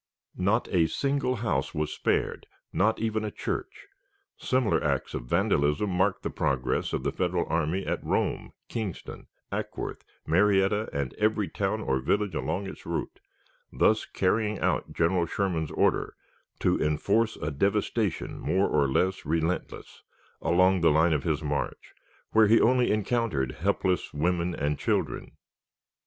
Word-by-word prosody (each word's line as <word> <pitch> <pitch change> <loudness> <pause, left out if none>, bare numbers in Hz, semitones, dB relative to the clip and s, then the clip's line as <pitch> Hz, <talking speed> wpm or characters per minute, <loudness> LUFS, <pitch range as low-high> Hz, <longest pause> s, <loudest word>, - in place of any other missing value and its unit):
Not 100 +6 +2
a 85 -4 +3
single 140 - 0
house 105 - -1
was 75 0 -1
spared, - - -1 0.3
not 110 +3 +2
even 110 -1 -1
a 105 - -2
church. 370 - -5 0.5
Similar 130 -4 +1
acts - - -1
of - - -4
vandalism 75 +10 +1
marked 95 +2 +1
the - - -2
progress 65 -2 -1
of - - -2
the - - 0
Federal 90 -1 0
army 85 +4 -1
at - - -2
Rome, - - -1 0.2
Kingston, 110 -7 -6 0.2
Acworth, - - -4 0.2
Marietta, 100 +4 +3
and 70 -3 -3
every 105 -1 +2
town 105 +2 -1
or 65 -9 0
village 100 +8 0
along 100 +2 -2
its 95 - -8
route, - - -4 0.5
thus 110 0 +2
carrying 105 +2 0
out - - 0
General 85 +1 +1
Sherman's 85 -5 -1
order - - +1 0.5
"to - - +2
enforce 100 +9 +1
a 75 - -4
devastation 100 +4 -1
more 95 +2 +1
or 70 -2 +2
less 95 +8 0
relentless" 80 +3 -2 0.4
along 90 +2 +3
the 85 - +5
line 80 +2 +4
of 75 -3 -1
his 80 -1 0
march, 75 -1 -3 0.4
where 110 -1 +5
he 115 +2 +6
only 125 +1 +3
encountered 105 - 0
helpless 95 +1 -1
women 85 +3 0
and 75 +1 -1
children. - - -2
95 Hz, 145 wpm, -27 LUFS, 80-105 Hz, 0.5 s, he